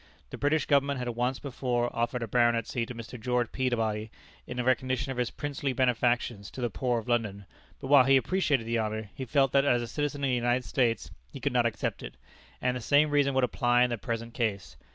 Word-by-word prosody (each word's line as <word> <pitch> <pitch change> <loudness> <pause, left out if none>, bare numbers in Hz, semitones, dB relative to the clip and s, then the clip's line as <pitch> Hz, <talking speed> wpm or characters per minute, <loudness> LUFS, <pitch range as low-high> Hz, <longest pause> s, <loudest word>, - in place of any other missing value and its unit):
The - - -6
British 145 +2 +1
Government 140 -1 +2
had 125 -1 -3
once 125 +2 -1
before 125 -3 -2
offered 120 +1 -1
a - - -4
baronetcy 120 0 +1
to 125 - -7
Mr. 115 +1 -8
George 125 -1 0
Peabody 110 -4 -1 0.4
in 125 - -5
recognition 130 +1 0
of 125 - -4
his 120 -2 0
princely 140 -2 -3
benefactions 120 -4 0
to - - -10
the 120 -2 -1
poor 125 +1 0
of 115 - -5
London, 105 -5 -1 0.3
but - - -8
while 135 -1 +6
he 135 0 +6
appreciated 145 -5 +1
the 115 0 0
honor, 110 -1 -3
he 130 - -6
felt 135 +1 +2
that 140 0 +4
as 125 -4 +3
a - - -5
citizen 145 +2 -3
of 135 - +2
the - - +1
United 120 +1 +1
States, 120 -4 0 0.2
he - - -8
could - - -1
not - - +3
accept - - -3
it, - - -8 0.5
and 125 0 +1
the 125 - -4
same 145 +6 +3
reason 140 -2 +2
would 130 - +3
apply 120 +1 +3
in 125 - +1
the 120 - -1
present 115 0 -4
case. 100 - -2
125 Hz, 220 wpm, -28 LUFS, 115-135 Hz, 0.5 s, while